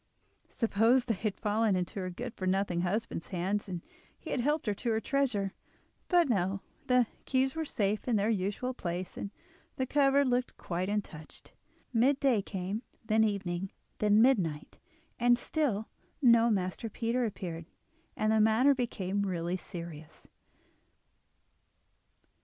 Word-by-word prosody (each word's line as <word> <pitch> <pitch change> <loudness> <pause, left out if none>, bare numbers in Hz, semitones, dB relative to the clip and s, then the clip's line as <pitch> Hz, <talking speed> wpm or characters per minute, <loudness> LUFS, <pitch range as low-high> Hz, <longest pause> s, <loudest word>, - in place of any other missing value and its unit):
Suppose 230 +2 +3
they 230 - +1
had 210 0 -3
fallen 215 -1 +2
into 180 +2 -2
her 185 -1 -3
good 235 +6 -6
for 185 - -4
nothing 185 -2 +1
husband's 190 -1 -2
hands 195 +3 -2
and 175 -2 -5 0.3
he - - -8
had - - 0
helped 295 +5 +1
himself 210 -3 -2
to 240 - 0
her 220 -1 +2
treasure! 230 -7 0 0.5
But 350 -3 +4
no, 195 -4 0 0.3
the 250 -1 +4 0.2
keys 265 0 +1
were 320 0 -2
safe 210 -5 -1
in 240 - +2
their 205 0 +2
usual 210 +5 -1
place, 180 -5 -4
and 200 - -5 0.5
the 260 - -1
cupboard 280 +1 +3
looked 245 0 0
quite 180 +2 -3
untouched. 195 -7 -5 0.4
Mid 260 +4 +3
day 255 -7 +3
came, 195 +2 -4 0.2
then 220 0 +3
evening, 195 -3 -1 0.3
then 210 +1 +5
midnight, 180 - +1 0.4
and 240 0 +5
still 245 -8 -1 0.3
no 235 -4 +6
Master 195 +2 -1
Peter 235 +3 -1
appeared, 170 -7 -4 0.5
and 215 0 +2
the 220 0 +4
matter 225 +6 +5
became 205 -6 -2
really 175 -2 -1
serious. 170 -4 -8
210 Hz, 145 wpm, -31 LUFS, 185-245 Hz, 0.5 s, no